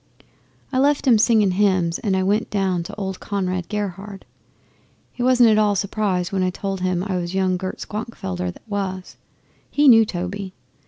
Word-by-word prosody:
'I 260 - +2
left 285 +1 +2
'em 230 -4 +6
singing 215 -3 +4
hymns 185 -3 +1
and 195 -4 0
I 190 - +1
went 205 +4 0
down 190 -4 0
to 170 - -8
old 190 -2 -4
Conrad 185 -3 -3
Gerhard. 200 -1 -5 0.9
He - - -8
wasn't 245 -2 +5
at 215 - +4
all 210 -1 +2
surprised 195 -2 -1
when 195 -1 0
I 185 - +1
told 195 +1 -4
him 185 -1 0
I 190 -2 -2
was 175 +1 -4
young 190 -1 +1
Gert 185 +1 -5
Schwankfelder 95 - -4
that - - -19
was. 190 -3 -4 0.5
He 290 0 +3
knew 225 -3 +8
Toby. 190 0 -5
195 Hz, 175 wpm, -21 LUFS, 185-210 Hz, 0.9 s, knew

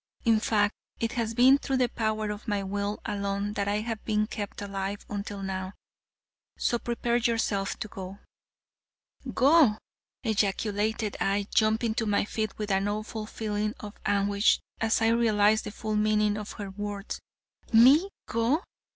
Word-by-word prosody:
In 225 -2 +5
fact, 210 -1 +2 0.3
it 230 -1 -1
has 230 -2 -2
been 260 +4 +6
through 270 -1 -1
the 250 -1 +3
power 215 -2 -1
of 210 +3 -8
my 205 -2 0
will 200 +1 -2
alone 200 0 -2
that 200 -1 -1
I 205 +1 +1
have 225 -1 -4
been 215 -1 +1
kept 205 -2 -6
alive 200 0 -4
until 205 -1 -5
now. 190 0 -4 0.8
So 240 - +1
prepare 235 0 0
yourself 225 -4 0
to - - -5
go." 190 -1 -8 1.1
"Go!" 275 -5 +5 0.5
ejaculated 210 0 0
I, 200 +1 +1
jumping 220 +1 +2
to 225 0 -1
my 205 -1 +2
feet 215 0 -3
with 210 -1 -3
an 195 +1 +2
awful 215 +1 -4
feeling 210 -1 -2
of 210 -1 -8
anguish 200 +1 +3 0.2
as 225 0 +2
I 225 - +4
realized 220 -2 +3
the - - -5
full 215 0 -3
meaning 210 0 +2
of 210 0 -6
her 200 -2 -6
words. 205 0 -5 0.5
"Me, 270 - +7 0.2
go? 235 - +1
210 Hz, 155 wpm, -28 LUFS, 205-225 Hz, 1.1 s, Me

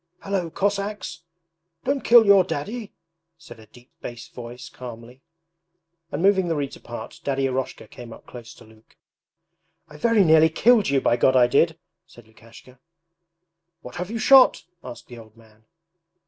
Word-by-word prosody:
'Hallo, 195 -4 -3
Cossacks! 200 -2 -3 0.6
Don't 275 -1 -2
kill 235 -1 +6
your 200 -2 +6
Daddy!' 205 +8 -6 0.5
said 120 -8 -15
a 110 - -16
deep 120 +3 -20
bass 120 -1 -9
voice 120 0 -10
calmly; 120 +1 -12 0.9
and 150 +5 -4
moving 190 -2 +3
the 165 - -1
reeds 140 -2 -4
apart 120 -2 -10
Daddy 135 -1 -1
Eroshka 130 -4 -4
came 120 +2 -12
up - - -14
close 120 -2 -12
to - - -17
Luke. 110 0 -23 0.9
'I 150 - -13
very 225 +3 +3
nearly 160 -1 +5
killed 220 - +3
you, 140 -1 +1
by 120 - +1
God 130 - +2
I 125 -1 +6
did!' 120 - +1 0.3
said 120 - -18
Lukashka. 115 +3 -18 1.0
'What 125 - -10
have 180 +1 -5
you 230 - -4
shot?' 260 +3 +5 0.2
asked 125 - -10
the 120 -1 -12
old 110 0 -17
man. 110 -1 -23
135 Hz, 160 wpm, -23 LUFS, 120-195 Hz, 1.0 s, kill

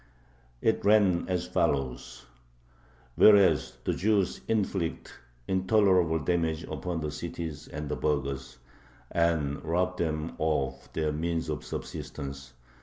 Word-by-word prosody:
It - - +2
ran 100 -5 +4
as 90 -1 0
follows: 70 -9 -1 0.9
Whereas 100 -3 +5
the - - 0
Jews 100 -1 +1
inflict 95 -6 -1 0.3
intolerable 95 -3 +3
damage 80 0 0
upon 90 -3 -4
the 75 -1 -3
cities 80 -1 -6
and 75 -1 -6
the 75 - -2
burghers, 70 -4 -2 0.5
and 80 -5 +1
rob 90 +3 0
them 80 -1 -2
of 65 -5 -1
their 80 -1 0
means 80 +1 -2
of 75 - -3
subsistence... 70 -1 -7
80 Hz, 110 wpm, -28 LUFS, 75-90 Hz, 0.9 s, Whereas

